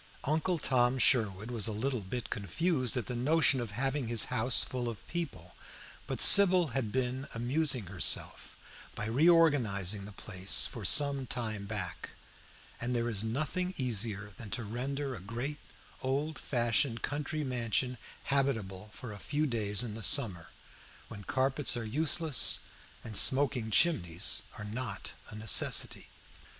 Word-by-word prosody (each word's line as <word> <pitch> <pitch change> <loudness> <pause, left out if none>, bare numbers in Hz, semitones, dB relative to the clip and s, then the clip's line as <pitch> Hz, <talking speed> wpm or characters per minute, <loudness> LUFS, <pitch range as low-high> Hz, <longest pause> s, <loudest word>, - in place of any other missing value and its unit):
Uncle 160 +5 -1
Tom 125 -3 0
Sherwood 110 -4 +2
was 115 -4 +2
a - - -3
little 120 +1 -3 0.3
confused 130 - -1
at 120 - -3
the 125 - -6
notion 135 +1 +2
of 120 - -6
having 135 +4 -3
his 115 -2 +1
house 120 +2 +3
full 125 -3 -5
of 115 - -11
people; 170 -3 -6 0.5
but - - -5
Sybil 185 -4 +9
had 120 -4 -3
been 130 +2 -3
amusing 130 0 0
herself 90 -3 0 0.4
by 105 - -4
reorganizing 115 - +1
the 105 - -11
place 95 -1 -1
for 115 - -8
some 140 +2 +4
time 110 -4 -5
back, 105 0 -6 0.6
and 120 +1 -4
there 120 0 -2
is 105 -1 -2
nothing 155 +10 -3
easier 105 -5 -2
than 110 - -10
to 120 - -3
render 135 +5 -5
a 115 - -9
great 120 +9 -6 0.4
old 140 +3 -3
fashioned 120 -1 -1
country 150 +1 -4
mansion 125 -1 -2 0.2
habitable 110 -8 -2
for 125 0 -10
a 100 - -11
few 150 +6 -3
days 110 -5 -1
in 115 -3 -6
the 110 - -8
summer, 95 - +3 0.6
when 100 - -10
carpets 135 +2 -1
are 115 - -5
useless 155 +4 +2 0.4
and 110 - -9
smoking 130 -2 +3
chimneys 90 - +1 0.2
are 105 - -8
not 115 +4 -6 0.2
a - - -10
necessity. 110 -1 +2
125 Hz, 145 wpm, -30 LUFS, 110-140 Hz, 0.6 s, Sybil